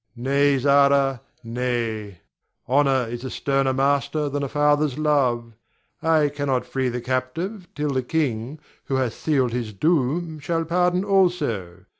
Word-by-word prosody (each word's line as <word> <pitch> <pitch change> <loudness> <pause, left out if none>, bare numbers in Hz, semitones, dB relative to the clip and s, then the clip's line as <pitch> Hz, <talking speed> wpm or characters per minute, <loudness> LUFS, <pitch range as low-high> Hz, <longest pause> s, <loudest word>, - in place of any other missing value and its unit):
Ber. 120 - -8
Nay, 140 +1 +3
Zara, 140 -1 +3 0.2
nay; 115 -5 -3 0.5
honor 135 -1 +3
is 120 +2 -6
a 130 - -4
sterner 135 +1 0
master 140 +2 0
than 145 +1 -2
a 140 - -2
father's 145 -1 +2
love. 130 -6 +1 0.5
I 155 -2 +3
cannot 140 -3 -1
free 130 -1 -1
the 125 0 -4
captive 145 - -3
till 150 0 -1
the 130 -1 0
king 130 -2 -2 0.3
who 135 - -2
hath 130 -3 0
sealed 135 -6 0
his 120 -3 -3
doom 155 - 0
shall 165 +2 -1
pardon 180 +2 +1
also. 145 - 0
140 Hz, 145 wpm, -23 LUFS, 125-150 Hz, 0.5 s, Nay